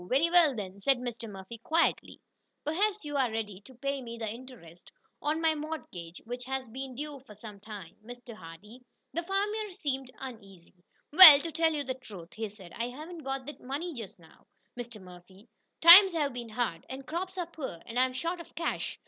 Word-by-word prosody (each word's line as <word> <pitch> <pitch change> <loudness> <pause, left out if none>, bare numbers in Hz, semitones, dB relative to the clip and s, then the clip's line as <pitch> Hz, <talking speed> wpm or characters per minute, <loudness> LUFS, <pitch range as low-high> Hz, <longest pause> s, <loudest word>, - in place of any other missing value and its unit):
"Very 305 +6 +2
well, 335 -6 +5
then," 200 -2 -6
said 270 +6 +3
Mr. 240 -2 -6
Murphy, 195 +3 -10
quietly, 325 +8 0 0.4
"perhaps 400 +5 0
you 290 0 -5
are 260 -3 +2
ready 210 -3 -4
to 260 +5 -16
pay 275 +2 -3
me 235 -2 -8
the 225 -1 -4
interest 220 -8 -11 0.3
on 305 +2 0
my 325 -1 +3
mortgage 295 - -7
which 245 +2 -6
has 265 0 -3
been 260 +2 -7
due 295 +2 -5
me - - -23
for 215 -6 -14
some 210 -1 -11
time, 200 -5 -10
Mr. 245 +1 -10
Hardee." 210 +6 -13 0.3
The 340 - -1
farmer 410 +4 -1
seemed 270 -7 -4
uneasy. 200 -9 -10 0.4
"Well, 315 -4 +12
to 330 - -5
tell 325 +1 +2
you 290 - -1
the 265 - -3
truth," 205 -10 -12
he 220 -1 -4
said, 195 -4 -13
"I 235 +1 -3
haven't 315 +7 -9
got 270 -3 -4
that 295 - -9
money 295 +7 -4
just 225 -7 -8
now, 165 -2 -21 0.3
Mr. 240 -2 -7
Murphy. 185 +3 -15 0.3
Times 360 +3 +11
have 295 -5 0
been 240 -2 -7
hard, 215 -7 -2
and 265 +1 -7
crops 370 +5 -4
are 355 - -1
poor, 305 - -7
and 240 +1 -3
I'm 255 0 +2
short 335 +7 -3
of - - -16
cash. 335 +2 -3
255 Hz, 200 wpm, -29 LUFS, 215-310 Hz, 0.4 s, Well